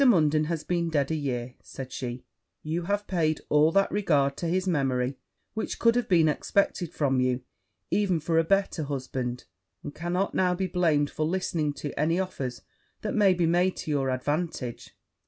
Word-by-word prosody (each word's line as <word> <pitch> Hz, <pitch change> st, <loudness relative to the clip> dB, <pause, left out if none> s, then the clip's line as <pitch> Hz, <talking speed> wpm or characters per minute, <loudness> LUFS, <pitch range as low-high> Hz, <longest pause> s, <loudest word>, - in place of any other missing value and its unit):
Munden 155 Hz, -, +4 dB
has 160 Hz, -1 st, -2 dB
been 170 Hz, 0 st, 0 dB
dead 145 Hz, -2 st, 0 dB
a -, -, +1 dB
year,' 125 Hz, -4 st, -3 dB
said 130 Hz, -1 st, -8 dB
she; 125 Hz, -1 st, -5 dB, 0.4 s
'you 165 Hz, +3 st, -2 dB
have 205 Hz, +2 st, -1 dB
paid 160 Hz, -5 st, 0 dB
all 150 Hz, +2 st, +5 dB
that 195 Hz, 0 st, +3 dB
regard 145 Hz, -9 st, +2 dB
to 170 Hz, -, -2 dB
his 185 Hz, +3 st, 0 dB
memory 135 Hz, -5 st, 0 dB, 0.3 s
which 220 Hz, -, -3 dB
could 230 Hz, 0 st, +4 dB
have 245 Hz, -2 st, 0 dB
been 165 Hz, -4 st, +5 dB
expected 175 Hz, +2 st, 0 dB
from 135 Hz, -3 st, +1 dB
you, 125 Hz, 0 st, +1 dB, 0.5 s
even 195 Hz, -5 st, +2 dB
for 160 Hz, +1 st, +1 dB
a -, -, +4 dB
better 190 Hz, -3 st, +1 dB
husband; 130 Hz, -3 st, -4 dB, 0.4 s
and 145 Hz, -, -6 dB
cannot 180 Hz, +4 st, -1 dB
now 180 Hz, -1 st, +2 dB
be 190 Hz, +1 st, -1 dB
blamed 165 Hz, -5 st, +1 dB
for 155 Hz, -, -1 dB
listening 165 Hz, -4 st, 0 dB
to 145 Hz, 0 st, -5 dB
any 165 Hz, +4 st, +2 dB
offers 135 Hz, -10 st, -4 dB, 0.4 s
that 215 Hz, -, -2 dB
may 200 Hz, -4 st, +4 dB
be 175 Hz, -1 st, +2 dB
made 175 Hz, +3 st, +2 dB
to 155 Hz, -, -4 dB
your 135 Hz, -2 st, +1 dB
advantage.' 130 Hz, -1 st, -3 dB
160 Hz, 180 wpm, -27 LUFS, 140-180 Hz, 0.5 s, all